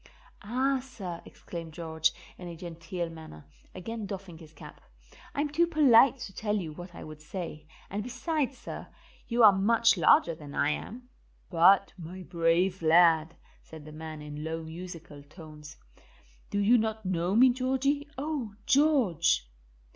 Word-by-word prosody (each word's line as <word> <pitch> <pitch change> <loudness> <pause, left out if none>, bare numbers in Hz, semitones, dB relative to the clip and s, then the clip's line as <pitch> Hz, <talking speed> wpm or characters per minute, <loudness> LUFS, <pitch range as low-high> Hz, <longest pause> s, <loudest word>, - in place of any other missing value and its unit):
"Ah, 260 +5 0
sir," 195 -10 -8
exclaimed 165 -2 -9
George, 160 -1 0 0.3
in 180 - -8
a 170 - -7
genteel 170 0 -5
manner, 155 - -12 0.3
again 215 +3 -6
doffing 190 -4 -8
his 160 -2 -14
cap. 155 - -13 0.5
"I'm 290 +1 0
too 325 +4 +2
polite 275 -5 +5
to 205 -5 -7
tell 210 +1 -2
you 170 -7 -3
what 175 +2 -10
I - - -9
would 155 -1 -10
say, 155 -2 -7 0.2
and 205 +2 -4
beside, 255 +4 -2
sir, 265 - -9 0.4
you 235 0 +2
are 210 - +10
much 225 +3 +3
larger 170 0 +4
than 150 -3 -10
I 145 - +2
am." 245 +10 -6 0.4
"But, 190 +3 +5
my 180 +3 -8
brave 175 +2 +1
lad," 165 -1 +4 0.3
said 160 -2 -12
the 155 - -10
man 155 0 -8
in 150 0 -7
low 160 +1 -4
musical 165 -2 -9
tones, 150 0 -13 0.7
"do - - -3
you 220 +4 +4
not 220 -1 -3
know 180 +1 0
me, 255 +3 +7
Georgie. 265 +3 -1
Oh, 270 -7 -4
George!" 260 - +3
180 Hz, 155 wpm, -29 LUFS, 160-235 Hz, 0.7 s, are